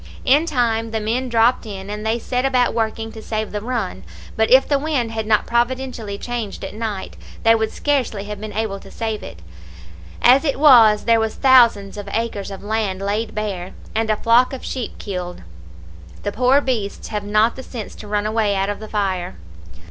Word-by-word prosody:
In 295 +5 +4
time 230 -6 0
the 220 0 -2
men 235 +4 -1
dropped 235 +2 +3
in, 195 -2 -7
and 210 0 -5
they 220 +1 0
set 250 +2 -2
about 255 -2 +2
working 225 0 -2
to 220 - -10
save 215 -1 -3
the 210 - -3
run, 220 - -3 0.3
but 220 0 +2
if 260 +1 +6
the 285 -2 +2
wind 275 -6 -1
had 220 -1 -3
not 215 -1 +3
providentially 240 -3 -1
changed 235 -3 -5
at - - -7
night, 215 -3 -5 0.3
they 225 - +6
would 220 -1 0
scarcely 260 -8 -1
have 210 0 -7
been 215 -1 -6
able 210 -2 -2
to - - -14
save 220 -2 -4
it. 85 0 -10 0.8
As 260 +4 +6
it 280 -3 -1
was, 230 -8 +7
there 230 -1 +4
was 220 -1 -1
thousands 235 -7 +4
of 205 -1 -6
acres 220 -3 -2
of 195 -1 -8
land 205 -3 -1
laid 205 +3 -2
bare, 195 -4 -4 0.2
and 220 0 0
a 215 - +2
flock 235 +4 +3
of 265 - -7
sheep 255 -3 -5
killed; 180 - -6 0.8
the 205 - -1
poor 255 +6 +3
beasts 225 -7 -3
have 210 -2 -3
not 215 +3 +2
the 265 - -7
sense 240 -4 -7
to 210 - -10
run 205 0 -1
away 215 -2 +1
out 195 +1 0
of 205 - -6
the 215 0 -9
fire. 190 - -2
220 Hz, 200 wpm, -20 LUFS, 205-245 Hz, 0.8 s, was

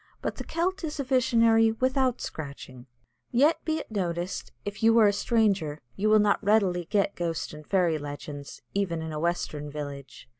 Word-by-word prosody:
But - - -4
the - - -5
Celt 365 +2 -2
is 305 -2 -4
a - - +1
visionary 230 -3 +4
without 255 +1 +1
scratching. 140 -4 -8 0.4
Yet, 285 +7 +3
be 315 -1 0
it 305 - -7
noticed, 175 -3 -3
if 205 +1 -5
you 225 +1 +5
are 225 - +7
a 205 - +4
stranger, 200 -9 +1 0.2
you 215 +2 +1
will 215 - +6
not 210 0 +2
readily 195 -4 +2
get 200 +1 +1
ghost 165 -3 -3
and 150 0 -11
fairy 175 -5 +2
legends, 145 0 -8
even 180 -5 -1
in 160 - -5
a 150 - -3
western 155 -3 -2
village. 140 -4 -8
200 Hz, 180 wpm, -27 LUFS, 155-230 Hz, 0.4 s, are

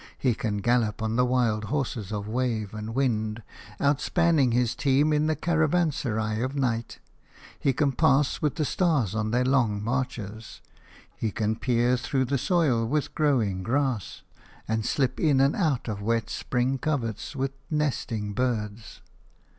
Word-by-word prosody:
He 125 -3 +2
can 105 -2 -2
gallop 115 -2 +1
on 110 0 -1
the 125 - +3
wild 115 -4 +1
horses 120 -6 -3
of 105 -1 -3
wave 115 -3 -1
and 110 +2 -6
wind, 110 -4 0 0.4
outspanning 145 0 +2
his 120 -1 +1
team 145 +3 +2
in 150 +1 +2
the 155 - +1
caravanserai 150 -11 0
of 130 +3 -2
night. 120 -4 -1 0.6
He 135 - +2
can 140 +2 +1
pass 140 0 +2
with 150 -2 0
the 155 - 0
stars 145 - +1
on 110 -1 -1
their 125 +3 +1
long 120 -6 +2
marches. 115 -3 -4 0.6
He 110 - -2
can 110 +1 -1
peer 120 +1 +1
through 130 +2 0
the 140 +1 0
soil 145 -8 +2
with 145 +6 -1
growing 120 -11 +1
grass 125 -1 -1 0.4
and 110 0 -1
slip 130 -2 0
in 145 -5 +3
and 135 +2 +3
out 155 - 0
of 105 -3 -4
wet 115 +1 -1
spring 130 +2 -1
coverts 135 -2 -2
with 135 0 -1 0.2
nesting 120 -9 -1
birds. 110 -3 -3
125 Hz, 155 wpm, -26 LUFS, 110-140 Hz, 0.6 s, the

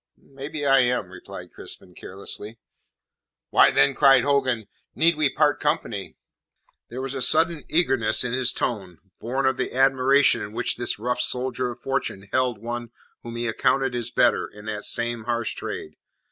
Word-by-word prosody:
"Maybe 140 +2 -7
I 135 -1 +5
am," 120 -7 0
replied 90 - -11
Crispin 90 - -7
carelessly. 100 +4 -6 0.9
"Why, - - +6
then," 135 0 +3
cried 135 -3 +5
Hogan, 130 -6 +1 0.3
"need 165 +1 +4
we 150 -2 +2
part 150 +1 +1
company?" - - -2 0.7
There 130 +3 -6
was 135 0 -4
a 135 - -4
sudden 160 +4 +2
eagerness 135 -11 +2
in 125 -1 -3
his 125 -1 +3
tone, 95 -7 -3 0.2
born 130 +4 -2
of 130 -1 +2
the - - -3
admiration 135 +1 +4
in 105 - -7
which - - -1
this 120 0 -1
rough 125 +3 -2
soldier 125 0 -1
of 120 0 -9
fortune 135 -7 -3
held 125 -3 +1
one 120 +2 -5 0.3
whom 115 0 -8
he 120 0 -3
accounted 130 +3 +1
his 120 -1 -3
better - - +2
in 105 0 -14
that 105 -1 -4
same 120 -1 -1
harsh 120 -1 -1
trade. - - -7
125 Hz, 165 wpm, -24 LUFS, 115-135 Hz, 0.9 s, Why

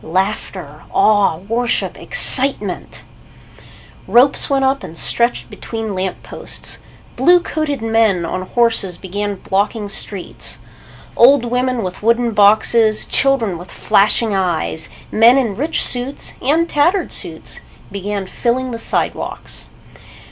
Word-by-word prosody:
Laughter, 190 +6 -3
awe, 210 - +3
worship, 240 +2 -1
excitement! 255 -8 +3 1.0
Ropes 260 +3 +3
went 270 -1 +1
up 270 +1 0
and 165 - -9
stretched 235 +7 +1
between 225 -2 -6
lamp 185 0 -4
posts. - - -5 0.4
Blue 355 0 +5
coated 300 -7 -3
men 220 -6 +1
on 185 +2 -4
horses 210 -3 0
began 205 +2 -4
blocking 205 +3 -2
streets. 200 -2 -2 0.6
Old 255 +1 +5
women 250 0 -1
with 185 -1 -6
wooden 235 +2 +1
boxes, 215 +1 +3
children 235 -10 0
with 180 - -11
flashing 215 +1 +1
eyes, 170 -4 -2 0.2
men 230 +4 +5
in 230 -7 0
rich 305 +8 0
suits 250 +3 -2
and 320 +6 +1
tattered 345 +6 +1
suits - - -5 0.3
began 200 0 -4
filling 250 +6 -2
the 230 - -5
sidewalks. - - -3
225 Hz, 120 wpm, -17 LUFS, 200-255 Hz, 1.0 s, Blue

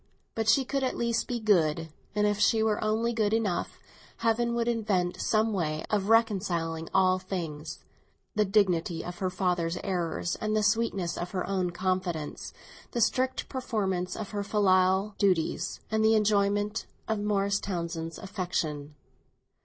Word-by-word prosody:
But 225 -1 0
she 270 +2 +4
could 275 +1 -1
at 260 - -1
least 235 -1 0
be 245 -1 -2
good, 165 -7 +2 0.3
and 210 0 +2
if 205 0 +1
she 220 +1 +4
were 220 -1 +1
only 225 +2 +1
good 215 -1 +1
enough, 210 -6 -1 0.4
Heaven 235 +1 +1
would 235 0 0
invent 205 -7 0
some 220 0 +2
way 155 -5 -1
of 205 -1 +1
reconciling 185 -8 +1
all 185 -1 +3
things—the 180 +3 -5
dignity 185 -5 +1
of 175 0 -7
her 185 - 0
father's 180 -2 0
errors 175 -3 -1
and 215 0 -1
the 215 - +2
sweetness 205 -5 0
of 175 - -3
her 185 - -1
own 185 -2 0
confidence, 175 -3 -2 0.4
the 240 - -1
strict 255 +3 +1
performance 190 -8 -2
of 215 - -6
her 205 -1 -2
filial 190 0 +3
duties 185 -5 +1
and 220 0 +2
the 220 0 +5
enjoyment 205 0 +1 0.2
of 220 -1 0
Morris 200 -1 +1
Townsend's 170 -3 -4
affection. 170 -7 -3
200 Hz, 150 wpm, -28 LUFS, 175-220 Hz, 0.4 s, the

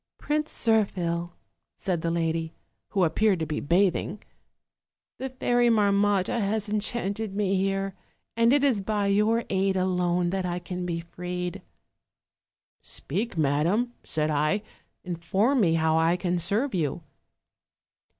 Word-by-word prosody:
" - - -66
'Prince 300 +1 -1
Zirphil,' 175 -6 +1 0.5
said 180 -5 -1
the 165 - -1
lady, 165 -1 -1 0.3
who 195 - +1
appeared 190 +4 +3
to 160 - -2
be 150 0 -3
bathing, 185 +4 +1 1.0
'the 265 - -3
Fairy 245 -1 +2
Marmotta 205 0 +2
has 210 +1 0
enchanted 210 -1 -2
me 200 -2 +1
here, 195 0 0 0.4
and 230 +1 +4
it 285 +1 +4
is 250 -8 +3
by 205 +1 -1
your 210 +4 +2
aid 190 0 +1
alone 180 -1 +1
that 190 0 -1
I 175 -1 -2
can 180 0 -5
be 170 -1 -2
freed.' 180 +1 -5 0.6
" - - -62
'Speak, 200 - -4
madam,' 165 - +1
said 155 -1 -1
I, 155 +8 +1 0.4
'inform 190 - +1
me 165 -4 +3
how 160 0 +2
I 165 +2 +3
can 180 -1 -1
serve 210 - +1
you.' 155 -7 -1
190 Hz, 140 wpm, -26 LUFS, 170-215 Hz, 1.0 s, and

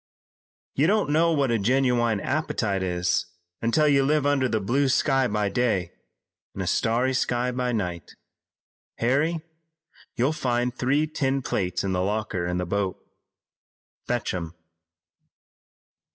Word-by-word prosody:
"You 145 +4 +2
don't 205 -5 +2
know 165 +2 +3
what 140 -5 +1
a 115 - +1
genuine 120 -1 +2
appetite 110 -10 -1
is 90 -1 0 0.3
until 135 +7 +2
you 140 -2 +4
live 150 +1 +2
under 140 -3 +2
the 110 - 0
blue 130 +7 +1
sky 130 0 +2
by 105 -3 0
day, 100 -7 0 0.6
and 95 - -3
a - - -4
starry 115 +8 +1
sky 125 -1 0
by 125 0 -1
night. 90 -8 -4 0.8
Harry, 145 +7 +1 0.7
you'll 130 +6 +1
find 125 -4 -1
three 135 +5 +1
tin 135 -3 -1
plates 90 -6 -1
in 95 - -1
the 90 -1 0
locker 100 -3 -2
in 90 0 -1
the 90 - -1
boat. 95 +1 -1 1.1
Fetch 120 -1 -1
'em." 85 -2 -5
120 Hz, 135 wpm, -25 LUFS, 100-135 Hz, 1.1 s, you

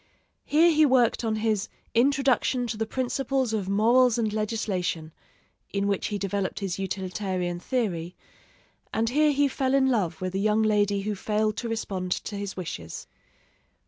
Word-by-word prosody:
Here 330 +3 +5
he 310 0 +4
worked 255 -5 +3
on 220 -1 0
his 215 -2 0 0.2
'Introduction 260 0 +2
to 235 - -3
the 220 +1 -2
Principles 260 0 -1
of 200 -3 -2
Morals 235 +4 +4
and 220 -3 0
Legislation,' 200 -7 -2 0.6
in 200 0 -1
which 200 -1 0
he 205 - -2
developed 195 -1 -2
his 195 -2 -3
utilitarian 185 -2 -3
theory, 180 -7 -2 0.8
and 225 +1 0
here 300 +4 +3
he 285 0 +3
fell 265 0 0
in 265 -1 +3
love 180 -9 0
with 185 0 -3
a 195 - -1
young 215 +2 +2
lady 205 -2 +2
who 210 +1 -2
failed 215 +2 0
to 235 - -3
respond 190 -5 -3
to 210 - -5
his 200 -1 -5
wishes. 155 - -6
215 Hz, 160 wpm, -26 LUFS, 195-245 Hz, 0.8 s, Here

